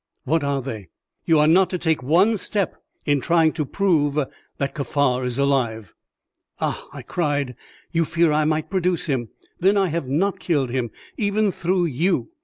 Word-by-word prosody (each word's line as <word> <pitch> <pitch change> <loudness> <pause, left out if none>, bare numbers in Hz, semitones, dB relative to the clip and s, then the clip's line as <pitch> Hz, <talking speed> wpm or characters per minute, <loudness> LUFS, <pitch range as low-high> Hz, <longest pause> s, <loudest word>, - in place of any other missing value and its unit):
"What 160 +2 +1
are 140 -2 -1
they?" 110 -7 -6 0.4
"You 165 - +4
are 150 - +5
not 180 +3 +5
to 185 - -2
take 160 -4 0
one 175 - +3
step 200 -1 -1 0.3
in 145 -2 +2
trying 165 0 +3
to 150 -4 -2
prove 155 -7 +1
that 140 -1 -4
Kaffar 140 -3 0
is 125 -1 -2
alive." 120 -8 0 0.7
"Ah!" - - -2
I - - -9
cried; 145 -7 -1 0.4
"you 165 -1 +2
fear 170 0 +2
I 150 0 +2
might 155 +1 -1
produce 180 -2 0
him. 130 -7 -1 0.3
Then 195 +3 +3
I 195 -2 +2
have 160 -4 -2
not 180 +9 0
killed 140 -8 0
him, 125 -2 -1 0.3
even 205 -1 +1
through 180 +1 0
you. 170 - 0
155 Hz, 175 wpm, -22 LUFS, 140-180 Hz, 0.7 s, are